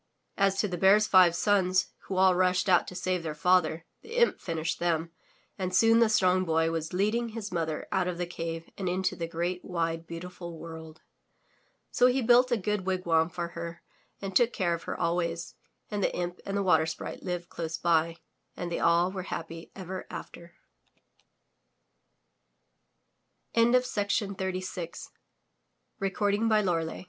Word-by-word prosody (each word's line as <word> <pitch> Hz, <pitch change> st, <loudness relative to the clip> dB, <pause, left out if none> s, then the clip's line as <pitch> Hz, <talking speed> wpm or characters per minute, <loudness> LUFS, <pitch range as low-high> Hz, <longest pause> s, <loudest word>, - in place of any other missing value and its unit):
As 195 Hz, -1 st, +2 dB
to 210 Hz, -, +2 dB
the 180 Hz, -3 st, -4 dB
Bear's 200 Hz, +3 st, +6 dB
five 185 Hz, -4 st, +6 dB
sons, 185 Hz, -1 st, +2 dB, 0.2 s
who 190 Hz, -, -3 dB
all 190 Hz, 0 st, +5 dB
rushed 185 Hz, +1 st, +2 dB
out 180 Hz, -2 st, +4 dB
to 180 Hz, -, -8 dB
save 185 Hz, 0 st, -1 dB
their 155 Hz, -2 st, -5 dB
father, 170 Hz, -1 st, +2 dB, 0.2 s
the 455 Hz, +2 st, -9 dB
imp 475 Hz, -1 st, +3 dB
finished 165 Hz, -2 st, -3 dB
them, 165 Hz, -1 st, 0 dB, 0.5 s
and 185 Hz, -1 st, -2 dB
soon 225 Hz, +3 st, +5 dB
the 230 Hz, -2 st, +4 dB
Strong 185 Hz, -3 st, +3 dB
Boy 160 Hz, -1 st, +1 dB
was 160 Hz, -1 st, -3 dB
leading 215 Hz, +6 st, 0 dB
his 215 Hz, -2 st, -6 dB
mother 160 Hz, -3 st, -2 dB
out 185 Hz, -1 st, +1 dB
of 180 Hz, -1 st, -3 dB
the 175 Hz, -, -1 dB
cave 165 Hz, -1 st, -5 dB
and 185 Hz, -2 st, -1 dB
into 185 Hz, +1 st, 0 dB
the 165 Hz, -, -4 dB
great, 175 Hz, +2 st, -3 dB
wide, 165 Hz, -2 st, -2 dB
beautiful 170 Hz, 0 st, -8 dB
world. 160 Hz, -1 st, -10 dB, 0.9 s
So 250 Hz, -, +5 dB
he 255 Hz, +1 st, +1 dB
built 245 Hz, +2 st, +5 dB
a 240 Hz, -, +3 dB
good 210 Hz, -1 st, -1 dB
wigwam 175 Hz, -3 st, +1 dB
for 170 Hz, 0 st, -4 dB
her 170 Hz, 0 st, -7 dB, 0.4 s
and 195 Hz, -1 st, -6 dB
took 240 Hz, +2 st, +4 dB
care 175 Hz, -4 st, 0 dB
of 170 Hz, -, -4 dB
her -, -, -4 dB
always, 170 Hz, 0 st, -1 dB, 0.4 s
and 205 Hz, -1 st, -1 dB
the -, -, +2 dB
imp 175 Hz, 0 st, -3 dB
and 200 Hz, 0 st, -1 dB
the 200 Hz, -, 0 dB
Water 180 Hz, -4 st, +3 dB
Sprite 160 Hz, -, -6 dB
lived 175 Hz, -1 st, -4 dB
close 165 Hz, -1 st, -4 dB
by, 165 Hz, -1 st, +1 dB, 0.4 s
and 175 Hz, -1 st, -4 dB
they -, -, -1 dB
all 170 Hz, +2 st, +3 dB
were 190 Hz, -1 st, -4 dB
happy 165 Hz, 0 st, -6 dB
ever 185 Hz, -1 st, -6 dB
after. 170 Hz, 0 st, -9 dB
180 Hz, 155 wpm, -28 LUFS, 165-190 Hz, 0.9 s, Bear's